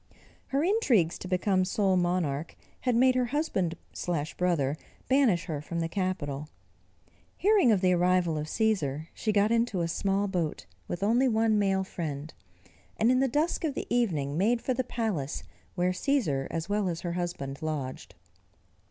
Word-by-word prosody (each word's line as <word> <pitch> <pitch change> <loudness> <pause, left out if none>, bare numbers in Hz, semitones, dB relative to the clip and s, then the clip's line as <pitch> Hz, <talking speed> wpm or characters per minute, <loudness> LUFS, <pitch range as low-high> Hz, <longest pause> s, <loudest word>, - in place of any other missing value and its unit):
Her 275 +2 0
intrigues 265 - +2
to - - -7
become 185 +1 +2
sole 190 0 +1
monarch, 175 -4 0 0.2
had 250 -2 0
made 255 +2 +5
her 250 -1 +1
husband 235 - -1 0.6
brother 160 -6 +1 0.3
banish 245 -10 +3
her 155 -5 -4
from 170 +3 -4
the 165 - 0
capital. 160 -6 -3 0.9
Hearing 395 - +4
of 200 -4 +3
the 185 -1 +4
arrival 180 -2 +2
of 150 0 -3
Cæsar, 160 -8 0
she 215 - -1
got 205 +1 +3
into 230 -5 +1
a 165 - 0
small 195 +4 0
boat, 175 -5 -2 0.2
with 175 +2 -4
only 240 +6 +3
one 220 -2 +2
male 195 -1 +2
friend, 155 -5 -5 0.6
and 225 +3 +4
in 255 - +3
the 270 - +3
dusk 300 +8 0
of 300 -4 -1
the - - -3
evening 155 - 0
made 230 +5 +3
for 255 - -1
the 260 +1 -1
palace 210 - -3 0.3
where 180 0 +1
Cæsar 185 - 0
as 165 +1 -3
well 205 -2 0
as 170 -1 -4
her 175 -1 -3
husband 170 -6 -4
lodged. 140 -10 -4
185 Hz, 165 wpm, -28 LUFS, 165-230 Hz, 0.9 s, made